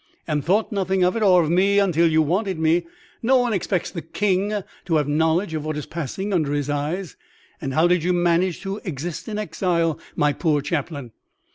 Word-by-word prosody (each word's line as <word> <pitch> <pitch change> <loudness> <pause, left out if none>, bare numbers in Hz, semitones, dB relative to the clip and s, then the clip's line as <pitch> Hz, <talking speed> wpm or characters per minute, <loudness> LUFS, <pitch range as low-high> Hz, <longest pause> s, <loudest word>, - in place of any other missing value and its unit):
"And 150 -3 -1
thought 205 - +1
nothing 190 -2 0
of 180 +1 +2
it 230 - -1
or 185 -4 +5
of 155 - -1
me 195 +3 +3
until 175 -4 +3
you 160 0 +4
wanted 185 +4 -1
me. 160 - +2 0.3
No 260 +2 +4
one 245 -2 +1
expects 185 -2 -1
the 170 - -5
King 200 +3 -1 0.2
to 170 -3 0
have 150 -2 +2
knowledge 160 +4 +1
of 155 -2 -3
what 155 -1 -3
is 150 - -4
passing 180 +6 -4
under 155 -5 +1
his 145 0 -1
eyes." 155 +4 -3 0.4
"And 135 -1 -3
how 160 +2 +4
did 175 -2 +2
you 180 - +1
manage 175 0 +1
to 195 +2 -4
exist 165 0 -5
in 215 -2 -4
exile, 170 -4 0 0.2
my 145 0 +2
poor 150 -3 +1
chaplain?" 145 -4 -3
170 Hz, 205 wpm, -22 LUFS, 155-190 Hz, 0.4 s, or